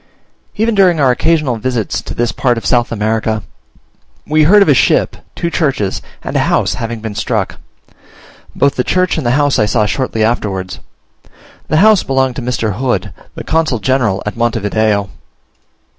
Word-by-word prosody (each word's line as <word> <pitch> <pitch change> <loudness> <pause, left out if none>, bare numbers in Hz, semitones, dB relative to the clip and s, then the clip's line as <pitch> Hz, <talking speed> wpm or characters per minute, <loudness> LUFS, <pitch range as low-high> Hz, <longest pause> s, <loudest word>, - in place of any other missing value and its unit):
Even 225 +2 +1
during 185 -5 +3
our 135 -3 +4
occasional 150 -2 +1
visits 115 -2 -2
to - - -8
this 120 0 0
part 125 -3 0
of 115 - -6
South 120 -1 +1
America, 110 -1 -1 0.8
we 155 0 +2
heard 200 +5 +6
of - - -3
a 145 - +6
ship, 130 - +2 0.2
two 170 - -2
churches, 135 - -1 0.2
and - - -5
a - - +3
house - - +1
having 115 -1 -5
been 110 -1 -5
struck. 105 - -2 1.0
Both 140 0 +1
the 125 - +1
church 185 +4 +1
and 155 -7 -2
the 125 +3 +2
house 145 -2 +2
I 105 - +2
saw 105 0 +1
shortly 115 -1 -1
afterwards: 100 -5 -2 0.9
the 155 - +1
house 215 -4 +5
belonged 130 -2 0
to - - -3
Mr. 115 -5 -2
Hood, 125 -7 -1 0.2
the - - -6
consul 160 -6 0
general 115 -5 0
at 105 - -4
Monte 115 0 0
Video. 105 -1 0
125 Hz, 175 wpm, -14 LUFS, 110-145 Hz, 1.0 s, heard